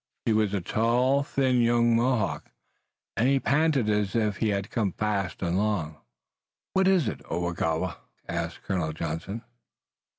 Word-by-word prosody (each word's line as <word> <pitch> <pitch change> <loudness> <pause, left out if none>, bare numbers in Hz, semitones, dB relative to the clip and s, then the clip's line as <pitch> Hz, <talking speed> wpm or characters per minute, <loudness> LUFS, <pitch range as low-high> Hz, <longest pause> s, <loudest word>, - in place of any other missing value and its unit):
He 115 - +3
was 110 -2 +2
a 100 - -1
tall, 120 +8 +2
thin 130 -3 +1
young 120 0 +3
Mohawk, 115 -3 0 0.7
and 120 - +2
he 135 0 +3
panted 140 -3 +2
as 105 0 0
if 105 -3 +1
he 110 - +1
had 100 -1 -2
come 105 -6 0
fast 100 -3 -2
and 90 +1 +1
long. 95 -8 -1 0.8
"What 190 0 +3
is 185 -9 +3
it, - - -4
Oagowa?" 85 0 -1 0.3
asked 85 0 -4
Colonel 85 -5 -1
Johnson. 85 +7 -4
105 Hz, 145 wpm, -27 LUFS, 90-120 Hz, 0.8 s, He